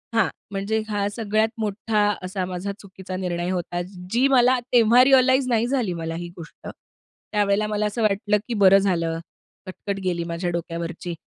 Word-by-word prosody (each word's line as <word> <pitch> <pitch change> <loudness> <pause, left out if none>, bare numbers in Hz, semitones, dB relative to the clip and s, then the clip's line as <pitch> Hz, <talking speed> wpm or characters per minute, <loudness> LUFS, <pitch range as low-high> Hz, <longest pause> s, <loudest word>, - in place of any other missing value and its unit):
हां, 225 -4 +4 0.2
म्हणजे 200 +3 -1
ह्या 205 -1 -1
सगळ्यात 215 +1 0
मोठा 215 0 -1 0.2
असा 185 0 -3
माझा 185 +2 -4
चुकीचा 190 -1 -9
निर्णय 175 -1 -2
होता. 175 -1 -2 0.3
जी 250 +4 +3
मला 255 -1 +4
तेव्हा 240 +1 +6
रिअलाइझ 260 0 +4
नाही 235 0 +2
झाली 245 -8 0
मला 165 -1 -4
ही 175 +1 -6
गोष्ट, 165 -1 -11
त्यावेळेला 205 0 -3
मला 210 0 -1
असं 210 +3 -2
वाटलं 210 0 +2
की 240 - -3
बरं 190 +1 +8
झालं 170 -4 0 0.5
कटकट 195 +1 -5
गेली 175 -2 -1
माझ्या 170 +1 -3
डोक्यावरची. 170 0 -4
200 Hz, 160 wpm, -23 LUFS, 175-220 Hz, 0.5 s, बरं